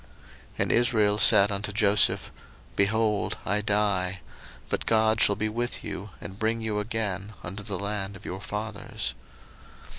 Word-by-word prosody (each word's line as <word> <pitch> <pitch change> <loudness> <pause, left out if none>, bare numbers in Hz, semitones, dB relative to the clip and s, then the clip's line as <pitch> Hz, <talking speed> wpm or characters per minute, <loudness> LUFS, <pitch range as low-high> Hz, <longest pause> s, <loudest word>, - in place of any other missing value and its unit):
01:048:021 - - -22
And - - -1
Israel 110 -4 +3
said 105 -3 +7
unto 100 +1 -3
Joseph, 105 0 +3 0.4
Behold, 105 +1 +1
I 105 +2 +1
die: 100 -3 0 0.5
but - - -3
God 110 0 +3
shall 100 - +5
be 110 +2 -1
with 120 +3 -3
you, 100 +2 -6
and 95 +4 -9
bring 110 +1 0
you 110 -2 -2
again 105 -2 -3
unto 95 +4 -5
the 105 -2 -4
land 100 0 -3
of 95 - -13
your 95 +1 -5
fathers. 105 - -4
105 Hz, 150 wpm, -27 LUFS, 100-110 Hz, 0.5 s, said